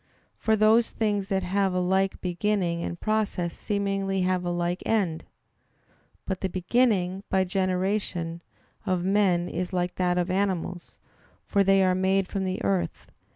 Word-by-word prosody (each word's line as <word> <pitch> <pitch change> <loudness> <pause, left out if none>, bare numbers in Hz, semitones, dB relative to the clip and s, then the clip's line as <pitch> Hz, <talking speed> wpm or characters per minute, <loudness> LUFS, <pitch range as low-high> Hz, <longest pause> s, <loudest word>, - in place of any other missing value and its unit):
For 220 - +2
those 220 +2 +4
things 205 -3 -1
that 190 -1 0
have 190 +1 0
a - - +2
like 190 +2 +1
beginning 180 -2 -1
and 170 - -5
process 210 -5 -1
seemingly 195 -2 -1
have 185 0 +1
a 175 - -2
like 175 +1 -1
end. 185 -8 0 1.0
But 190 -2 -3
the 190 - -1
beginning, 190 -1 +1
by 190 -1 +3
generation, 185 -2 -1 0.5
of 185 -2 +1
men 190 -3 +2
is 180 +2 -4
like 180 0 -1
that 180 -1 +1
of 180 0 0
animals, 185 -2 -2 0.5
for 200 -1 +2
they 195 0 +4
are 185 -1 +3
made 190 +1 +1
from 195 -1 -3
the 185 - -3
earth. 95 -4 -2
185 Hz, 155 wpm, -26 LUFS, 180-200 Hz, 1.0 s, those